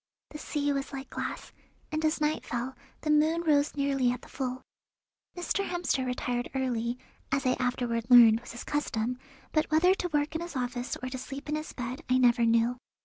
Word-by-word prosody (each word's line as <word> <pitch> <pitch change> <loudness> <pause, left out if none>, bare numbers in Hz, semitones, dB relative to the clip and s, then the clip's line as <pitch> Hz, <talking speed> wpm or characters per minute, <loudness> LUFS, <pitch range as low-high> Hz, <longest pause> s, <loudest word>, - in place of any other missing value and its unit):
The 300 - -7
sea 290 -2 -1
was 275 -1 -3
like 270 -1 -7
glass, - - -5 0.4
and 310 +1 -1
as 310 +1 +2
night 305 0 0
fell 245 +2 -3 0.3
the 305 - 0
moon 315 +3 +3
rose 295 -2 +2
nearly 275 -3 +2
at 250 - -5
the - - -13
full. 255 -1 -4 0.7
Mr. 355 +3 0
Hemster 350 -8 -1
retired 245 -1 -2
early, 245 -2 -1 0.3
as 275 -1 0
I 255 - +4
afterward 245 -2 -1
learned 230 -3 +9
was 240 - -10
his 235 - -7
custom, 250 -4 -1 0.3
but 310 0 +1
whether 335 +4 +5
to 360 -2 -3
work 295 0 0
in 320 - -2
his 340 -2 -6
office 245 0 -2
or 255 - -2
to 260 0 -5
sleep 275 +3 -7
in 300 - 0
his 310 0 -4
bed 250 +4 -5
I 255 - +4
never 240 -2 +4
knew. 230 +2 +3
265 Hz, 200 wpm, -29 LUFS, 245-300 Hz, 0.7 s, learned